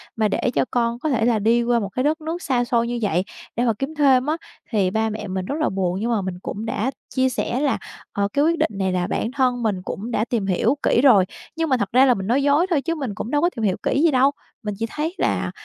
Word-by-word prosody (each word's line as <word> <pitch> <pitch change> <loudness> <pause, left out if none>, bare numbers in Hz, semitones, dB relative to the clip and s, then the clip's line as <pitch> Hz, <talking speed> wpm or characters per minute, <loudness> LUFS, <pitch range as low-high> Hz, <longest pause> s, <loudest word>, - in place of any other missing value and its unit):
mà 220 -1 +2
để 235 - 0
cho - - +2
con 235 -1 0
có 310 - -1
thể 230 -5 +1
là 235 -2 +2
đi 230 +3 +3
qua 240 0 +2
một 200 -3 -3
cái 255 +6 -2
đất 310 +3 +1
nước 325 +3 -4
xa 255 -6 +1
xôi 235 -1 +1
như 240 0 -2
vậy 185 -4 +1 0.3
để 240 - +1
mà 230 - +3
kiếm 275 +4 -3
thêm 270 -4 +4
á 310 +2 0 0.3
thì 195 -5 +2
ba 220 +2 0
mẹ 215 -1 -5
mình 185 -1 -3
rất 280 - -3
là 310 - +2
buồn. 185 -1 -1
Nhưng 230 +3 -1
mà 220 -3 +1
mình 185 -1 -5
cũng 210 +3 -5
đã 225 +3 -1 0.2
chia 260 0 +3
sẻ 245 0 -2
là, 285 -1 +1 0.4
ờ, 200 0 +1
cái 285 +1 +3
quyết 335 +1 +2
định - - +1
này 190 -1 0
là 180 -1 0
bản 230 - -2
thân 255 -3 +1
mình 200 -5 0
cũng 225 +5 -5
đã 220 -1 +1
tìm 235 -4 -1
hiểu 205 +7 +2
kỹ 240 - +3
rồi, 215 -9 +6 0.3
nhưng 325 -1 -1
mà 260 - +3
thật 200 -4 -1
ra 255 +3 +6
là 255 - +5
mình 195 -4 -4
nói 260 +5 +2
dối 290 +5 +3
thôi 315 -6 +2
chứ 335 +2 -2
mình 265 -10 -4
cũng 225 - -5
đâu 290 - +2
có 345 - +3
tìm 230 - -4
hiểu 190 -3 +1
kỹ 280 - +1
gì 335 - +5
đâu. 270 +1 +4 0.3
Mình 210 -1 -3
chỉ 225 - -1
thấy 315 +7 -3
là, - - 0
240 Hz, 290 wpm, -22 LUFS, 210-275 Hz, 0.4 s, rồi